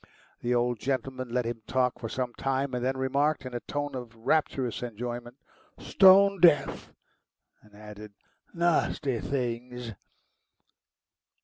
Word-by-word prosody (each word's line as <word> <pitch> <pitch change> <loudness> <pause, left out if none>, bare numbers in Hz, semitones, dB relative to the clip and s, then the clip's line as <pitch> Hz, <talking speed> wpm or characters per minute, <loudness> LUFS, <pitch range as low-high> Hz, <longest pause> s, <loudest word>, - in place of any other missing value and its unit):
The 120 +1 0
old 120 -1 0
gentleman 130 0 -3
let 125 0 -1
him 115 -1 -4
talk 125 -1 0
for 115 - -5
some 125 0 -3
time, 135 +1 -2
and 125 -1 -2
then 130 +1 0
remarked, 140 +2 0
in 130 - -7
a 120 - -2
tone 145 +3 -4
of 125 -3 -7
rapturous 125 0 0
enjoyment: 120 +1 -6 0.4
"Stone 195 0 +5
deaf," 145 -5 +3 0.7
and 105 -1 -21
added, 105 0 -11 0.4
"Nasty 155 -6 0
things." 125 -2 -4
125 Hz, 125 wpm, -28 LUFS, 120-140 Hz, 0.7 s, Stone